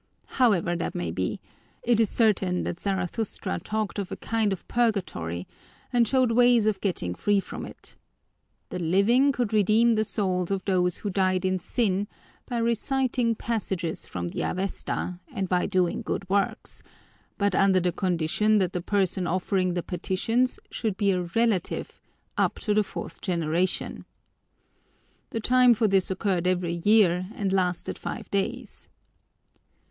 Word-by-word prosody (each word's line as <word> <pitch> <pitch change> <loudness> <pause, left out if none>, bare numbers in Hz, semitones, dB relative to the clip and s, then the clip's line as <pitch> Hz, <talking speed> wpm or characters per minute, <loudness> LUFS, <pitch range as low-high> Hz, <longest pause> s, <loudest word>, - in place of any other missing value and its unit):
However 185 -8 +3
that 170 - -3
may 85 -2 -2
be, 90 +2 -2 0.4
it 235 -2 +3
is 225 -3 +3
certain 195 -5 +2
that 175 - -4
Zarathustra 195 +2 -2
talked 215 -1 -3
of 195 - -4
a - - -2
kind 225 -2 0
of 190 - -5
purgatory 175 - -1 0.5
and 240 -2 +4
showed 255 0 +3
ways 240 -1 +5
of 210 -3 0
getting 170 - -1
free 205 - +1
from - - -6
it. - - -11 0.7
The 180 - -4
living 200 - +3
could 245 -5 -2
redeem 215 +3 +4
the 215 -1 +2
souls 185 -4 -1
of 195 -2 -2
those 180 -2 +1
who 205 - -4
died 185 -1 +1
in 185 0 +1
sin 200 0 0 0.4
by 245 - -3
reciting 235 +1 +1
passages 190 -8 -3
from 85 -1 -4
the - - -4
Avesta 185 -1 -3
and 195 -6 -2
by 180 0 +1
doing 185 -2 +1
good 195 - -3
works, 195 +1 -1 0.6
but 200 -1 +1
under 190 0 +4
the 180 0 +1
condition 185 +4 +1
that 185 -3 +1
the 180 - -2
person 190 -1 0
offering 185 0 0
the 175 - -1
petitions 225 +8 0
should 215 -5 -2
be 200 -1 +2
a 180 -1 0
relative, 195 +1 -1 0.4
up - - +1
to 210 - +1
the 215 - +4
fourth 205 - -7
generation. 170 0 -1 1.2
The 225 - -3
time 250 +1 +5
for 220 0 +2
this 195 -2 +2
occurred 185 -2 0
every 175 -2 0
year 185 -4 +4
and 195 -2 -1
lasted 180 -2 -1
five - - -6
days. 205 +4 -3
195 Hz, 150 wpm, -26 LUFS, 180-220 Hz, 1.2 s, ways